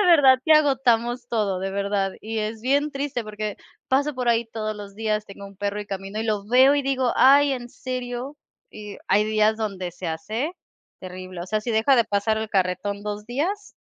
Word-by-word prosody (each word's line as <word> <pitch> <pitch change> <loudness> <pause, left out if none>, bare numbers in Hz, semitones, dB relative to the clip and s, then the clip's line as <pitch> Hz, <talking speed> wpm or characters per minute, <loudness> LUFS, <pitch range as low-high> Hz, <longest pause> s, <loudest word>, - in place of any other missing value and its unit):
de 415 - +3
verdad 285 -7 +7
que 315 - +5
agotamos 250 -5 +3
todo, 210 -5 0
de 195 +1 -2
verdad, 200 0 -1
y 220 +1 -4
es 215 +1 -3
bien 285 +3 +2
triste, 275 -3 -3
porque 215 -1 -5 0.3
paso 285 +3 +1
por 250 -1 -2
ahí 230 0 +1
todos 215 -1 -3
los 205 -1 -9
días, 215 0 -1
tengo 200 0 -11
un 195 0 -14
perro 205 0 -2
y - - -15
camino, 195 +1 -5
y 225 - -2
lo 210 -2 -1
veo, 260 +5 +6
y 290 - +2
digo: 265 -2 0
"Ay, 280 +2 +6
¿en 245 -2 -5
serio?". 250 +2 -5 0.3
Y 210 - -10
digo, - - -12
hay 210 +1 +4
días 215 0 +2
donde 195 -5 -3
se 180 +1 -7
hace 220 - -3 0.5
terrible, 185 -1 -8
o - - -8
sea, 215 +3 -1
si 235 - -4
deja 225 +5 +4
de 235 - +4
pasar 210 +1 0
el 220 0 -3
carretón 195 +2 -1
2 210 0 -5
días, 350 - -3
220 Hz, 210 wpm, -24 LUFS, 205-260 Hz, 0.5 s, verdad